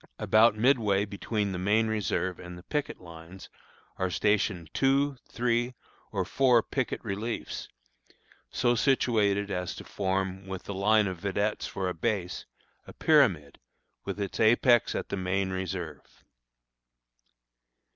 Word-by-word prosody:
About 110 0 +4
midway 110 -4 +2
between 105 0 -2
the 90 - -4
main 105 +4 +2
reserve 100 -4 -1
and 90 0 -9
the 90 - -12
picket 150 +5 -3
line 85 +1 -12 0.6
are 95 - -1
stationed 95 -4 0
two, 135 +1 +2
three, 120 +1 0 0.4
or - - -1
four 125 -4 +3
picket 130 -3 -2
reliefs, 110 +3 -4 0.8
so 120 0 +1
situated 105 -6 +2
as 90 -1 -3
to - - -9
form, 95 -1 -2
with 95 -1 -6
the 100 - -6
line 105 +2 +3
of 95 -3 -4
vedettes 100 +2 -1
for 95 -1 -3
a 90 - -1
base, 90 0 -3 0.4
a - - -10
pyramid, 70 -1 +2 0.4
with - - -5
its 100 -1 -4
apex 120 +1 +4
at - - -4
the 100 - -3
main 95 +1 -1
reserve. 95 -5 -6
100 Hz, 135 wpm, -28 LUFS, 95-115 Hz, 0.8 s, About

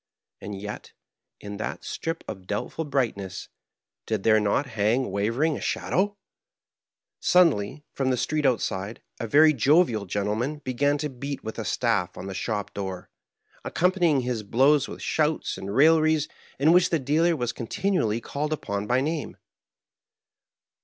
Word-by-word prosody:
And 100 -1 -6
yet, 105 +1 -7 0.5
in 100 0 -7
that 105 - -5
strip 165 +1 -4
of 95 -1 -8
doubtful 105 +10 -3
brightness, 115 -10 -2 0.6
did 110 -3 -1
there 110 -1 +5
not 105 +7 +1
hang 115 0 0
wavering 115 +11 +1
a - - -6
shadow? 205 +2 0 1.0
Suddenly, 150 - +3
from 135 -1 0
the 130 - +1
street 150 +5 -1
outside, 110 -5 -1 0.2
a 115 - -3
very 155 +6 +6
jovial 135 - +3
gen 100 +2 -1
tleman 125 +8 -2
began 145 +3 +1
to 150 +1 -3
beat 140 +2 -6
with 110 +1 -6
a 110 - -4
staff 115 -2 0
on 90 - -6
the 95 - -5
shop 105 +1 -3
door, 95 -2 -5 0.5
ac - - -6
companying 175 -6 +3
his 125 -3 -2
blows 135 +7 +3
with - - -8
shouts 155 0 0
and 100 +2 -6
railleries 155 +1 +4 0.3
in 145 +4 +4
which 180 +1 +5
the 165 - +2
dealer 160 +5 +2
was 120 -5 -2
continually 125 - -1
called 145 +5 -4
upon 100 -9 -3
by 125 +3 +2
name. 155 +1 -3
130 Hz, 155 wpm, -26 LUFS, 105-155 Hz, 1.0 s, very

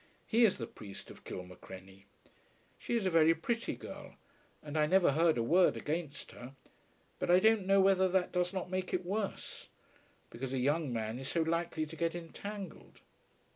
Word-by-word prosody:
He 230 +1 +4
is 205 - +2
the 115 - -4
priest 100 -3 -10
of - - -14
Kilmacrenny. 95 +1 -10 0.7
She 240 - -2
is 225 -4 0
a 185 - +2
very 165 0 +5
pretty 230 +8 -2
girl, - - -10 0.5
and 150 0 -7
I 150 -1 +3
never 185 -1 +4
heard 160 +1 +3
a 115 - +1
word 175 +9 +4
against 155 -1 -4
her; 125 +2 -11 0.6
but - - -2
I 180 +1 +7
don't 220 -1 +3
know 195 0 +5
whether 190 -1 +4
that 185 0 +1
does 180 -1 0
not 185 -1 -4
make 185 0 -1
it 180 0 -3
worse, 200 +2 -4 0.6
because 130 +3 -5
a - - 0
young 145 +2 +1
man 110 0 -3
is 135 - -6
so 165 +2 +1
likely 165 -1 -1
to 160 +1 -9
get 165 0 -1
entangled. 190 +3 -8
165 Hz, 180 wpm, -33 LUFS, 135-185 Hz, 0.7 s, I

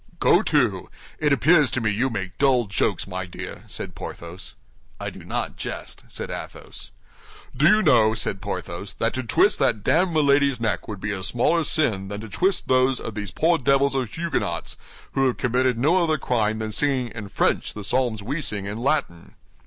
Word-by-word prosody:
"Go - - +5
to! - - +1 0.3
It 150 -1 +2
appears 150 0 +5
to - - -1
me 110 -2 0
you 120 +6 0
make 95 -7 -5
dull 130 -4 +3
jokes, 100 -1 0
my 95 -1 -5
dear," 90 - -8
said - - -5
Porthos. 85 +3 -8 0.4
"I - - -4
do - - -12
not - - -3
jest," - - -6
said - - -6
Athos. - - -8 0.7
"Do 145 +5 +4
you 215 +3 +5
know," 115 -8 +4
said 100 -3 -2
Porthos, 95 +2 -5
"that 115 - 0
to 130 - -2
twist 130 - +3
that 105 -3 +1
damned 175 - +2
Milady's 140 -3 +3
neck 110 -5 -1
would 105 -3 -7
be 105 - -2
a 100 -2 -4
smaller 125 - +1
sin 110 - +1
than 100 +1 -5
to 110 - -9
twist 185 - 0
those 130 0 +3
of 115 - -6
these 105 -2 -5
poor 165 - +2
devils 140 +1 +2
of 130 -4 -1
Huguenots, 170 -1 -3 0.4
who 135 -1 +2
have 125 - -1
committed 125 0 +1
no 165 +9 +3
other 160 -2 +1
crime 110 -5 0
than 110 -1 -4
singing 130 0 0
in 110 -4 -8
French - - 0
the 105 - -6
psalms 115 -1 0
we 140 +8 -3
sing 105 -8 -3
in 105 +3 -5
Latin?" 135 - -2
125 Hz, 190 wpm, -23 LUFS, 105-140 Hz, 0.7 s, Go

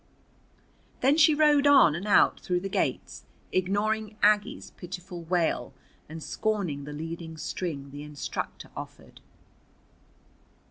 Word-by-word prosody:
Then 270 +3 +4
she 315 -1 +6
rode 295 -1 +4
on 275 - +7
and 175 +6 -5
out 205 - +4
through 180 -1 -1
the 195 - -4
gates, - - -2 0.2
ignoring 210 +3 0
Aggie's 210 -1 +2
pitiful 180 -1 -8
wail 170 -1 0 0.3
and 160 0 -8
scorning 190 -10 -2
the 150 - -7
leading 160 +2 -6
string 145 -5 -5
the 145 +1 -8
instructor 150 -1 -6
offered. - - -10
185 Hz, 120 wpm, -27 LUFS, 160-215 Hz, 0.3 s, on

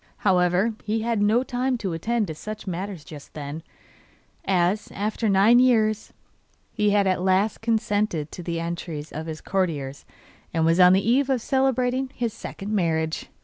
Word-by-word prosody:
However, 185 +3 +3
he 220 +1 -1
had 230 -2 0
no 220 +4 +3
time 255 0 -1
to 195 -6 -3
attend 225 +7 0
to 160 - -5
such 215 +7 -7
matters 185 -2 -5
just 150 -3 -12
then, 150 +1 -6 0.8
as, 190 +2 +1
after 215 +2 -1
nine 205 +5 +5
years, 220 -4 +2 0.6
he 210 0 +1
had 205 -1 +3
at 185 -1 +1
last 190 +3 +1
consented 210 -8 0
to - - -7
the 170 -1 -3
entreaties 165 -2 -5
of 160 +1 -6
his 160 -1 -6
courtiers, 150 -8 -2 0.5
and 160 -1 +2
was 165 +2 +3
on 180 0 +8
the 195 +2 +2
eve 265 +4 +3
of 265 -2 +2
celebrating 260 +1 +1
his 235 -3 -2
second 205 +2 -6
marriage. 160 -4 0
195 Hz, 165 wpm, -24 LUFS, 170-225 Hz, 0.8 s, on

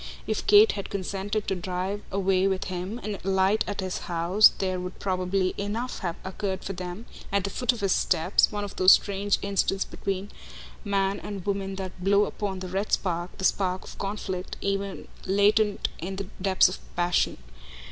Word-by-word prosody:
If - - -2
Kate 425 +1 +8
had 200 - -5
consented 200 +2 -3
to - - +1
drive 185 +3 -3
away 190 -1 +2
with 190 -1 0
him 185 +4 -4
and 205 -1 -4
alight 190 +2 +2
at 205 -1 -3
his 185 -1 -3
house 175 +5 +5
there 185 -1 -1
would 180 +1 -6
probably 185 0 0
enough 220 +5 -3
have 175 -3 -3
occurred 190 0 -3
for 195 - -4
them, 180 +4 -6 0.3
at 200 -1 +1
the 200 - -3
foot 250 -1 +1
of 235 -3 -7
his 195 -1 +1
steps, 175 +1 +3
one 205 -1 -3
of 200 - -7
those 185 +1 +8
strange 200 0 +1
instants 195 -1 +1
between 195 +1 -4 0.5
man 200 -1 0
and 200 -3 -7
woman 195 -1 -2
that 185 -1 -7
blow 200 +2 +4
upon 195 -3 -4
the 185 - -4
red 195 +3 -2
spark, 175 -1 -1
the 190 - -2
spark 185 -1 +1
of - - -11
conflict, 195 -2 -4
ever 195 0 -2 0.2
latent 205 +2 +3
in 185 +4 -4
the 195 0 -5
depths 190 -1 +5
of 185 - -5 0.2
passion. 175 0 +1
195 Hz, 180 wpm, -27 LUFS, 185-200 Hz, 0.5 s, Kate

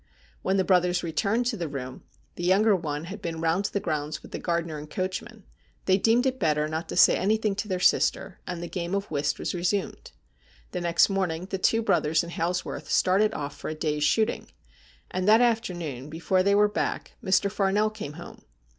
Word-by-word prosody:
When 190 +1 +1
the 190 - +3
brothers 180 -1 +2
returned 200 +8 0
to 235 -2 -1
the 170 -3 -3
room 130 -3 -6 0.2
— - - -37
the 175 - -6
younger 200 +4 +4
one 150 -4 -3
had 190 +4 -8
been 165 -1 -4
round 165 +4 +1
the 200 - -1
grounds 155 -4 -3
with - - -13
the - - -5
gardener 170 -3 -2
and 150 +1 -10
coachman 190 +5 -4 0.2
— - - -38
they 190 +1 +3
deemed 230 +5 +3
it 260 0 0
better 150 -3 +1
not 160 +2 -4
to - - -4
say - - +6
anything 215 +1 +1
to 210 - -3
their 185 -3 -2
sister, 190 +1 +2
and 175 -1 -4
the - - -4
game 175 +1 -3
of 200 -2 -3
whist 145 -1 0
was - - -3
resumed. 180 +3 -2 0.6
The 180 - -3
next 170 -1 +4
morning 185 -4 -1
the 190 - -2
two 225 +4 +2
brothers 155 -6 +2
and 170 - -7
Hailsworth 175 +2 -3
started 205 +4 +3
off 145 -1 -4
for - - -6
a 155 - -4
day's 150 -1 -1
shooting, 220 +9 +1 0.6
and 185 +1 -2
that 220 +2 +7
afternoon, 175 - -1
before 170 +4 +1
they 200 +2 +3
were 210 +1 +5
back, 205 - -3
Mr. 190 +1 +2
Farnell 205 +1 +1
came 205 -9 -7
home. 170 +3 -11
180 Hz, 210 wpm, -26 LUFS, 160-200 Hz, 0.6 s, that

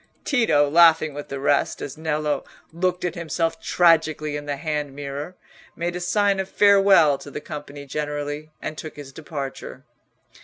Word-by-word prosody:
Tito, 225 - +3
laughing 160 -1 +5
with 145 0 -7
the 140 - -5
rest 140 +1 +1
as 135 - -6
Nello 155 -1 -1 0.3
looked 180 +1 -1
at 180 - -1
himself 165 -1 -2
tragically 155 -3 +2
in 145 0 -6
the 145 - -1
hand 150 -2 -3
mirror, 145 +4 -6 0.4
made 175 +1 -3
a - - -3
sign 200 +2 +1
of 190 0 -3
farewell 195 -8 +5
to - - -10
the - - -6
company 145 -2 -8
generally, 145 +1 -4
and 155 - -4
took 155 - -8
his 140 -2 -10
departure. 140 - -7
155 Hz, 160 wpm, -23 LUFS, 145-170 Hz, 0.4 s, laughing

